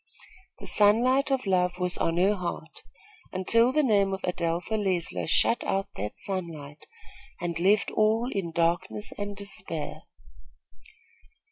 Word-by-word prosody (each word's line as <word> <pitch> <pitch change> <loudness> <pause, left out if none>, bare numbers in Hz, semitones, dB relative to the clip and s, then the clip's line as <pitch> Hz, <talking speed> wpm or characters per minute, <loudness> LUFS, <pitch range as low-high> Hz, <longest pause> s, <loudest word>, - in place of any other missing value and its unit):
The - - -10
sunlight 245 +7 +3
of 265 -3 0
love 180 -2 +1
was 180 0 0
on 165 0 0
her 190 +4 +4
heart, 175 -4 -6 0.5
until 230 +6 +3
the 305 +3 +2
name 200 -6 +3
of 190 - -12
Adelpha 170 +2 -2
Leisler 190 -5 -1
shut 230 +8 +3
out 195 +1 -1
that 105 +2 -5
sunlight 160 -7 -5 0.5
and 175 -1 -3
left 200 +4 +3
all 220 +2 +2
in 185 -4 -3
darkness 170 +5 -1
and 205 0 -4
despair. 185 -5 -5
190 Hz, 130 wpm, -27 LUFS, 170-210 Hz, 0.5 s, her